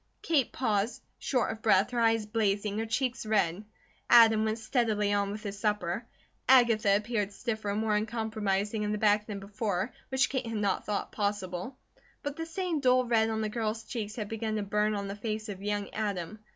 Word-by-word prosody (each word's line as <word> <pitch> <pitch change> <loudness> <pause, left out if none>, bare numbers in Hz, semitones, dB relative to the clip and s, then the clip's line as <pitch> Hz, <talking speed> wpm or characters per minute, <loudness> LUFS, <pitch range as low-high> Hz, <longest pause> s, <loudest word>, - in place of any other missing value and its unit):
Kate 290 -7 +2
paused, 215 -3 -1 0.2
short 250 -5 0
of 220 0 -8
breath, 205 -1 +3
her 245 - -1
eyes 225 -1 +3
blazing, 210 -1 0
her 225 - -2
cheeks 250 +2 -1
red. 205 -3 +1 0.5
Adam 225 -2 +7
went 220 0 0
steadily 215 -3 +1
on 200 -1 +1
with 210 +1 -6
his 200 -1 -5
supper. 210 0 -1 0.4
Agatha 230 -6 +5
appeared 210 -1 -1
stiffer 220 -1 -3
and 205 +2 0
more 220 -1 +1
uncompromising 215 -1 -1
in 210 0 -1
the - - -1
back 210 0 +3
than 205 -2 -5
before, 200 +1 -2 0.2
which 265 -1 +2
Kate 260 -3 -2
had 225 -1 -3
not 200 -2 0
thought 210 -1 -2
possible. 200 +2 -3 0.5
But 285 0 -3
the 325 0 -5
same 340 -1 -2
dull 255 -2 +4
red 225 -2 +2
on 220 0 -1
the 215 - -1
girl's 220 0 -2
cheeks 220 -2 -5
had 215 -3 -4
begun 220 0 -3
to 210 - -1
burn 210 +1 +1
on 200 -1 -3
the 200 - -5
face 215 +1 -4
of 195 -2 -6
young 205 0 -2
Adam. 205 -2 -3
215 Hz, 195 wpm, -29 LUFS, 205-230 Hz, 0.5 s, Adam